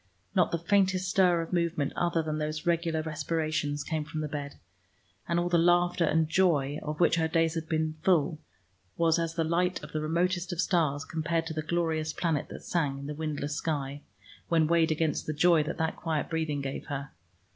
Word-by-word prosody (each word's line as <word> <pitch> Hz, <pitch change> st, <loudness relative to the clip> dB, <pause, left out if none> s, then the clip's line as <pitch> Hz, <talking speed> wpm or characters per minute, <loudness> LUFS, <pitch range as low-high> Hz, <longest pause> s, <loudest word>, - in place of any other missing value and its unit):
Not -, -, +3 dB
the 170 Hz, -, +1 dB
faintest 185 Hz, +1 st, +2 dB
stir 180 Hz, -4 st, +4 dB
of 165 Hz, -, -9 dB
movement 170 Hz, -4 st, 0 dB
other 170 Hz, -2 st, +1 dB
than 155 Hz, 0 st, -2 dB
those 155 Hz, 0 st, -3 dB
regular 165 Hz, -2 st, +1 dB
respirations 155 Hz, -2 st, -2 dB
came 160 Hz, -2 st, -2 dB
from 155 Hz, +1 st, -5 dB
the 155 Hz, -, -2 dB
bed, 145 Hz, -1 st, -5 dB, 0.7 s
and 170 Hz, 0 st, +1 dB
all 175 Hz, -, 0 dB
the 175 Hz, -1 st, +3 dB
laughter 175 Hz, 0 st, +3 dB
and 160 Hz, 0 st, +2 dB
joy 155 Hz, -4 st, +2 dB
of 150 Hz, 0 st, -5 dB
which 170 Hz, -1 st, +4 dB
her 160 Hz, -1 st, +2 dB
days 165 Hz, 0 st, +2 dB
had 160 Hz, -1 st, -4 dB
been 155 Hz, -1 st, -1 dB
full 165 Hz, -3 st, +2 dB, 0.6 s
was 165 Hz, 0 st, +3 dB
as 165 Hz, 0 st, -2 dB
the 165 Hz, -, +1 dB
light 180 Hz, +3 st, 0 dB
of -, -, -9 dB
the 155 Hz, -, -2 dB
remotest 175 Hz, +3 st, 0 dB
of 175 Hz, -, -5 dB
stars 160 Hz, -5 st, +1 dB
compared 165 Hz, +1 st, -1 dB
to 165 Hz, -, -4 dB
the 155 Hz, -, -2 dB
glorious 160 Hz, -1 st, -1 dB
planet 160 Hz, -4 st, -1 dB
that -, -, -9 dB
sang 145 Hz, -6 st, -1 dB
in 140 Hz, -, -7 dB
the 150 Hz, -, -4 dB
windless 150 Hz, -1 st, -3 dB
sky, 145 Hz, -3 st, -3 dB, 0.5 s
when 165 Hz, -2 st, +3 dB
weighed 165 Hz, 0 st, +3 dB
against 155 Hz, -1 st, 0 dB
the 155 Hz, -, -1 dB
joy 165 Hz, +1 st, +4 dB
that 150 Hz, -, -4 dB
that 160 Hz, -1 st, -1 dB
quiet 160 Hz, -2 st, -2 dB
breathing 160 Hz, -3 st, -1 dB
gave 135 Hz, 0 st, -5 dB
her. 140 Hz, -1 st, -5 dB
160 Hz, 200 wpm, -29 LUFS, 155-170 Hz, 0.7 s, stir